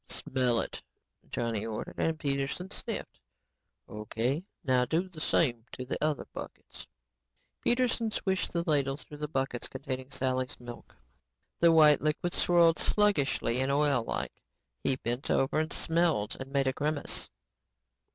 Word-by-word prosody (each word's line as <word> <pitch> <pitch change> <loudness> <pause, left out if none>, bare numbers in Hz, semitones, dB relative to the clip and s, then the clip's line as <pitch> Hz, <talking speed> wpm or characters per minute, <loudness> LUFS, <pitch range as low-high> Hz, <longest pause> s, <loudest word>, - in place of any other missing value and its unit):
"Smell 125 -3 +1
it," - - -6 0.5
Johnny 115 -3 -2
ordered. 115 +8 -2
Peterson 140 +6 -2
sniffed. - - -5 0.7
"O.K., 115 - -2 0.2
now 130 -2 +3
do 165 +8 0
the 170 -4 -10
same 135 -7 +3
things 115 +1 -31
to 130 - -5
the 130 - -3
other 155 -2 0
buckets." - - -9 0.8
Peterson 240 -2 +2
swished 190 -3 -1
the 170 -1 0
ladle 140 -3 +2
through 150 0 -11
the 150 - -2
buckets 135 -4 -2
containing 130 -1 -5
Sally's 130 -1 -1
milk. 120 -1 -10 0.6
The 170 -1 +6
white 155 -3 +7
liquid 155 +3 0
swirled 170 -2 +4
sluggishly 145 - +2
and 135 +1 +1
oillike. 140 -5 0 0.4
He 135 - +2
bent 120 0 -3
over 135 +3 +2
and 155 +1 -1
smelled 165 -10 +1
and 135 0 -7
made 140 -1 +2
a 130 - +2
grimace. 150 +1 -1
140 Hz, 140 wpm, -30 LUFS, 130-160 Hz, 0.8 s, white